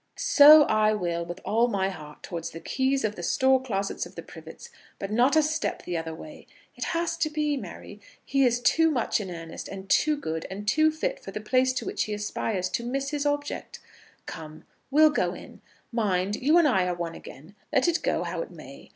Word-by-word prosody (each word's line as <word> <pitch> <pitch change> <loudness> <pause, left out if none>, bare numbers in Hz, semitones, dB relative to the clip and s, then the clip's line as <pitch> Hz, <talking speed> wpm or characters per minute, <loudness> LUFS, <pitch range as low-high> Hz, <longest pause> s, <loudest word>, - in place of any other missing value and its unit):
"So 300 +1 +8
I 215 -4 +2
will, 170 -4 -2
with 175 +2 -7
all 230 +3 +2
my 195 -4 0
heart, 150 -5 -10
towards 170 -2 -5
the 165 - -9
keys 265 +7 0
of 210 -1 -1
the 175 - -7
store 260 +8 +2
closets 200 -6 -3
of - - -18
the - - -7
Privets, - - -12 0.3
but 195 - -5
not 245 +7 +3
a 315 - +5
step 310 +1 -2
the 175 - -4
other 160 -1 -4
way. 300 - -12 0.3
It - - -4
has 335 -1 -1
to 335 -2 0
be, 300 -1 -1
Mary. 275 - -9 0.2
He 275 0 +2
is 245 -1 +2
too 325 +7 +3
much 245 -6 0
in 190 - -6
earnest, 165 -2 -8
and 195 -1 -8
too 300 +9 +3
good, 160 - -4
and 205 +2 -7
too 310 +7 +4
fit - - -3
for - - -10
the - - -5
place 255 +4 +2
to - - -4
which 385 +2 -1
he 210 - -3
aspires, 205 -2 -2
to 235 - -2
miss 275 +3 -3
his 295 -1 -1
object. 290 0 -3 0.5
Come, 155 -1 -9 0.3
we'll 305 +2 +5
go - - 0
in. - - -13 0.3
Mind, 205 -4 0
you 300 +8 +3
and 335 -3 +5
I 190 -9 +2
are 180 - -1
one 170 -1 -4
again, 155 +5 -12 0.2
let 265 - +2
it 340 -1 +1
go - - 0
how - - -3
it - - -6
may. - - -13
235 Hz, 220 wpm, -26 LUFS, 185-290 Hz, 0.5 s, So